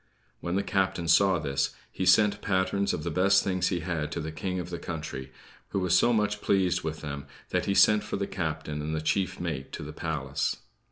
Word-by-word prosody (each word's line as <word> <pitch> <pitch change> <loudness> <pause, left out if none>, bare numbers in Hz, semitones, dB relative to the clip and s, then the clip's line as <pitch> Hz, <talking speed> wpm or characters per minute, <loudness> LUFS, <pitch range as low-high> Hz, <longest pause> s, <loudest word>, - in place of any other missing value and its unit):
When 85 +1 -3
the 100 - +1
captain 95 -4 0
saw 95 +3 +5
this, 70 -3 -1 0.2
he 95 - -2
sent 105 +2 +5
patterns 100 +1 +1
of 75 - -3
the 85 - -2
best 100 +4 +4
things 95 -2 0
he 90 -3 -1
had 80 -3 -2
to - - -3
the 80 +1 -4
King 90 +4 -3
of 90 0 -6
the 85 - -4
country; 75 -5 -6 0.4
who 100 - -1
was 90 -1 +2
so 120 - +5
much 105 -2 +1
pleased 90 -2 +2
with 80 0 -4
them, 70 -2 -6 0.2
that - - 0
he 100 - 0
sent 105 +1 +6
for 105 - -4
the 100 - -1
captain 80 -5 -3
and 80 +1 -2
the 80 - -2
chief 95 +4 0
mate 80 -6 -4
to - - -5
the 75 +1 -7
palace. 75 -4 -2
90 Hz, 220 wpm, -28 LUFS, 80-95 Hz, 0.4 s, sent